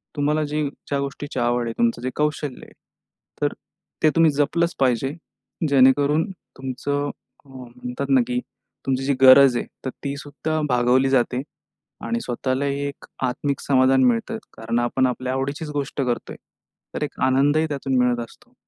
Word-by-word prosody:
तुम्हाला 150 +1 +1
जे 150 +1 -1 0.3
ज्या 140 -1 0
गोष्टीची 140 +1 -4
आवड 120 0 +1
आहे, 115 - -3
तुमचं 120 0 +1
जे 130 - -2
कौशल्य 150 -2 -1
आहे, - - -18 0.7
तर - - +1 0.5
ते 155 - +7
तुम्ही 165 -1 +5
जपलंच 155 +4 +1
पाहिजे. 135 +1 +1 0.6
जेणेकरून 140 +5 +4 0.3
तुमचं 140 +2 -2 0.4
अ, - - -21
म्हणतात 125 +1 -7
ना 135 -2 +5
की 125 0 0 0.5
तुमची 135 0 0
जी 140 - +2
गरज 135 0 +8
आहे - - -2 0.2
तर - - 0
ती 140 -1 -2
सुद्धा 145 +2 -3
भागवली 125 +2 +3
जाते 125 -1 +1 0.6
आणि 235 - -1
स्वतःलाही 135 - -1
एक 140 - -9 0.2
आत्मिक 140 +3 -2
समाधान 130 -1 +4
मिळतं. 125 - +1 0.2
कारण 115 +1 -2
आपण 125 +2 +1
आपल्या 130 +1 -2
आवडीचीच 140 +4 -3
गोष्ट 145 -1 -3
करतोय. 125 -3 -2 0.6
तर - - -2
एक 150 - -6
आनंदही 145 +4 +3
त्यातून 135 -2 -1
मिळत 125 -1 +2
असतो. 245 - -21
135 Hz, 155 wpm, -23 LUFS, 125-145 Hz, 0.7 s, गरज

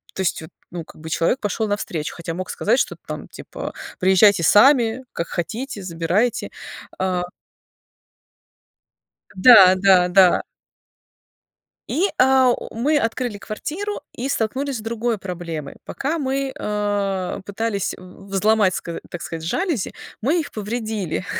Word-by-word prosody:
то - - -8
есть, 180 - 0
вот, 160 - -10 0.2
ну, 175 -1 -5
как - - -16
бы 160 - -7
человек 165 +11 +1
пошел 220 0 -1
навстречу, 180 -7 -3
хотя 170 -1 -5
мог 185 0 -5
сказать 235 +5 +1
что-то - - -2
там - - -6
типа: - - -8 0.3
"Приезжайте 190 0 +5
сами, 240 - +5
как 170 - -3
хотите, 215 +6 -4
забирайте". 180 +6 -1 0.5
А. 185 -1 0 2.1
Да, 190 -3 +8
да, 185 -2 +5
да. 185 -1 +5 1.5
И, 340 - 0
э, 265 0 +5
у - - -9
мы 290 +7 +2
открыли 230 -2 -1
квартиру 330 - -5
и 255 +3 -4
столкнулись 265 +3 -1
с - - -6
другой 230 +1 -2
проблемой. 170 -6 -6
Пока 295 +5 -2
мы, 270 -2 -2
э, 205 -3 -2
пытались 205 -1 -2
в 185 +2 -14
взломать, 205 -1 +3
сказа 170 - -5
так 175 - -7
сказать, 165 -1 -6
жалюзи, 285 - -1 0.3
мы 300 +9 +2
их 305 - -4
повредили, 215 -4 -3
205 Hz, 135 wpm, -21 LUFS, 185-245 Hz, 2.1 s, Да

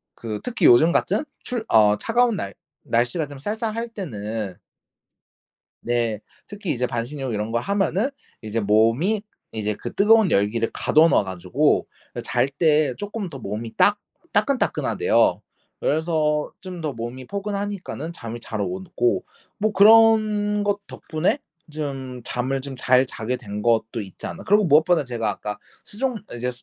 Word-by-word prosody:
그 110 -2 -5
특히 230 -8 +2
요즘 155 +8 +7
같은 205 - +1 0.2
출 240 -3 -3
어 105 -1 +5
차가운 240 -1 +2
날 100 - -4 0.3
날씨가 120 +7 0
좀 145 -1 -10
쌀쌀할 220 - -3
때는 110 - -5 1.3
네. 115 -3 0 0.3
특히 205 -5 -4
이제 125 -2 0
반신욕 125 +1 -4
이런 105 +2 -2
거 115 - +1
하면은 200 - 0 0.3
이제 110 +1 -2
몸이 115 - +2 0.3
이제 105 -1 -2
그 - - -7
뜨거운 215 -1 +5
열기를 110 +3 +1
가둬 155 +2 +4
놔 110 - +3
가지고 95 -2 0 0.4
잘 - - +1
때 150 -1 +2
조금 205 -1 -5
더 140 -4 -8
몸이 110 +1 -5
따 205 - +4 0.4
따끈따끈하대요. 280 - +2 0.4
그래서 155 -1 0
좀 185 -2 -7
더 155 -3 -2
몸이 120 +3 -6
포근하니까는 200 -5 -4
잠이 115 -6 -7
잘 110 -2 -4
오고 95 +3 -1 0.3
뭐 215 +1 +1
그런 215 -1 +5
것 205 0 0
덕분에 170 - -1 0.3
좀 135 -4 -5
잠을 130 +2 -2
좀 135 -1 -7
잘 130 +1 +3
자게 125 0 -3
된 105 0 -6
것도 115 0 +1
있지 95 -3 -9
않나. - - -8
그리고 205 +1 +4
무엇보다 160 +1 +4
제가 120 -4 -2
아까 105 0 -4 0.3
수족 250 +3 -2 0.2
이제 125 +1 -2
140 Hz, 280 characters per minute, -23 LUFS, -, 1.3 s, 요즘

